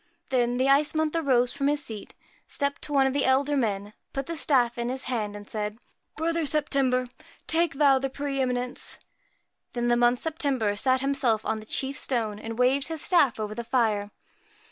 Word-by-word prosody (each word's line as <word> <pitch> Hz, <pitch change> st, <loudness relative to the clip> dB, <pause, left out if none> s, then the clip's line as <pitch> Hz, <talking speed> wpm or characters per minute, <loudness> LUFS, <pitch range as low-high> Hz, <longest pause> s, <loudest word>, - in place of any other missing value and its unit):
Then 245 Hz, -1 st, +1 dB
the 260 Hz, +1 st, +2 dB
Ice 285 Hz, +3 st, +3 dB
Month 315 Hz, 0 st, 0 dB
arose 255 Hz, -6 st, +2 dB
from 275 Hz, -, -1 dB
his 295 Hz, 0 st, +1 dB
seat, 215 Hz, -3 st, -7 dB, 0.3 s
stepped 280 Hz, -1 st, -2 dB
to -, -, -7 dB
one 275 Hz, -2 st, +4 dB
of 265 Hz, -, +1 dB
the 280 Hz, -, +1 dB
elder 275 Hz, +2 st, +2 dB
men, 205 Hz, -5 st, -1 dB, 0.2 s
put 275 Hz, 0 st, -3 dB
the 335 Hz, -, -4 dB
staff 245 Hz, -6 st, +2 dB
into 240 Hz, +1 st, -1 dB
his 265 Hz, -, -2 dB
hand, 215 Hz, -5 st, -3 dB
and 205 Hz, 0 st, -9 dB
said 210 Hz, 0 st, -4 dB, 0.2 s
' -, -, -34 dB
Brother 330 Hz, +1 st, 0 dB
September, 275 Hz, -4 st, +1 dB, 0.4 s
take 330 Hz, -2 st, +1 dB
thou 275 Hz, -2 st, +4 dB
the 270 Hz, +1 st, -2 dB
pre 275 Hz, 0 st, -3 dB
eminence.' 250 Hz, -1 st, -2 dB, 0.8 s
Then 240 Hz, 0 st, -1 dB
the 240 Hz, -, +4 dB
Month 240 Hz, +1 st, +4 dB
September 275 Hz, -10 st, -1 dB
sat 255 Hz, +4 st, +2 dB
himself 265 Hz, -6 st, +1 dB
on 220 Hz, -, 0 dB
the 215 Hz, 0 st, -10 dB
chief 275 Hz, +5 st, -1 dB
stone, 220 Hz, -5 st, -1 dB
and 225 Hz, +1 st, -6 dB
waved 260 Hz, +3 st, +2 dB
his 320 Hz, -2 st, -1 dB
staff 290 Hz, -11 st, +3 dB
over 215 Hz, -1 st, -3 dB
the 235 Hz, +2 st, -5 dB
fire. 225 Hz, -4 st, +1 dB
260 Hz, 195 wpm, -26 LUFS, 235-280 Hz, 0.8 s, one